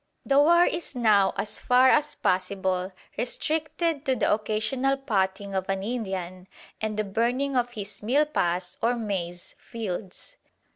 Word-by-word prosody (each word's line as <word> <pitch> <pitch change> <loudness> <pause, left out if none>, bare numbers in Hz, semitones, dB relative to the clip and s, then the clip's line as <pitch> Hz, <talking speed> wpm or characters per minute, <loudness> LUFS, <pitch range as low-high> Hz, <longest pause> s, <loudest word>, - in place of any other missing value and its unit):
The 275 0 +4
"war" 340 +4 +6
is 335 -4 -2
now 215 -5 +4
as 210 - -2
far 250 +1 +4
as 300 +1 +2
possible 185 0 -1 0.3
restricted 315 - -1
to 265 - +2
the - - +2
occasional 220 +6 0
"potting" 200 -6 -1
of 190 0 -2
an 195 0 -1
Indian 190 -5 -4 0.3
and 215 -1 -2
the 215 - +1
burning 245 +7 0
of 245 -1 +1
his 200 -3 -7
milpas 210 - 0
or 235 +2 +2
maize 185 -6 -4
fields. 215 - -6
220 Hz, 140 wpm, -26 LUFS, 190-270 Hz, 0.3 s, war